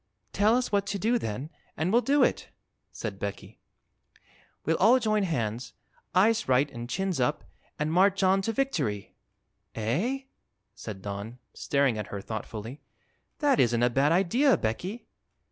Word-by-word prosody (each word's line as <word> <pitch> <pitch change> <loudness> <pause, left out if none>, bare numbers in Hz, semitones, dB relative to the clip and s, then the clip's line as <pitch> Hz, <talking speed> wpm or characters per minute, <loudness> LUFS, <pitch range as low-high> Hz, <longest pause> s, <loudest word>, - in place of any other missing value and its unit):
"Tell 210 +3 +3
us 250 0 -1
what 200 -1 +1
to 200 - -2
do, 230 +5 +1
then, 130 - -5 0.3
and 165 +4 0
we'll 240 - +5
do 280 +2 +3
it," - - 0 0.4
said - - -6
Becky. - - -6 1.1
"We'll - - +1
all 245 +3 +6
join 215 -2 +1
hands, 125 - -2 0.4
eyes 220 - +3
right 130 +3 +4
an' 120 -1 -7
chins 190 +2 -2
up, 125 +4 0 0.3
an' 150 +1 -1
march 195 +3 +3
on 190 +1 +4
to 225 - -1
victory!" 150 - -2 0.6
"Eh?" 170 - -1 0.5
said 100 -4 -8
Don, 100 +4 -6 0.2
staring 140 -6 +1
at 105 - -4
her 100 - -5
thoughtfully; 110 +5 -7 0.6
"that 285 -4 +3
isn't 120 0 +3
a 120 - +3
bad 140 +5 +2
idea, 230 - +3
Becky." 180 - -3
165 Hz, 150 wpm, -28 LUFS, -, 1.1 s, all